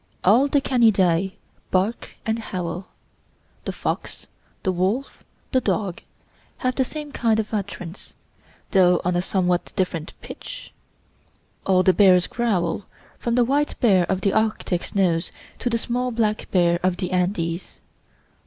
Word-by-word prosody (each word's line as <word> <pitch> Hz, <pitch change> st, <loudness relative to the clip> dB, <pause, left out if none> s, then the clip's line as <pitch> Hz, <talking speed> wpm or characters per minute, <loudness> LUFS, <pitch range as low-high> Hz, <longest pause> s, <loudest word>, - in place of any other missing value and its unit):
All 235 Hz, +9 st, +5 dB
the 285 Hz, 0 st, +2 dB
Canidae 195 Hz, -8 st, +3 dB, 0.4 s
bark 195 Hz, +5 st, -1 dB
and 225 Hz, +1 st, 0 dB
howl! 180 Hz, -3 st, -4 dB, 0.8 s
the -, -, -1 dB
fox, -, -, -4 dB, 0.4 s
the 190 Hz, -, +2 dB
wolf, 190 Hz, +9 st, -1 dB, 0.3 s
the 260 Hz, -, +3 dB
dog, 195 Hz, -7 st, -1 dB, 0.6 s
have 255 Hz, 0 st, 0 dB
the 265 Hz, -, +1 dB
same 300 Hz, +2 st, -6 dB
kind 225 Hz, -5 st, +1 dB
of 220 Hz, 0 st, -3 dB
utterance, 195 Hz, -3 st, -5 dB, 0.6 s
though 180 Hz, -2 st, +5 dB
on 180 Hz, 0 st, +1 dB
a 175 Hz, -, +2 dB
somewhat 180 Hz, -1 st, 0 dB
different 170 Hz, -4 st, -2 dB
pitch. -, -, -9 dB, 0.9 s
All 185 Hz, -1 st, +4 dB
the 185 Hz, -, +5 dB
bears 185 Hz, -3 st, +6 dB
growl, 205 Hz, -5 st, -1 dB, 0.3 s
from 235 Hz, -1 st, -1 dB
the 245 Hz, -1 st, +4 dB
white 285 Hz, +4 st, 0 dB
bear 190 Hz, -7 st, +4 dB
of 190 Hz, 0 st, 0 dB
the 195 Hz, -, +1 dB
Arctic 215 Hz, -5 st, 0 dB
snows 175 Hz, -4 st, +1 dB, 0.3 s
to 245 Hz, -, -1 dB
the 230 Hz, -, +1 dB
small 245 Hz, +2 st, -1 dB
black 220 Hz, -3 st, -1 dB
bear 175 Hz, -2 st, +3 dB
of 185 Hz, -1 st, +1 dB
the 180 Hz, -2 st, -3 dB
Andes. 180 Hz, -1 st, -1 dB
195 Hz, 145 wpm, -23 LUFS, 180-230 Hz, 0.9 s, bears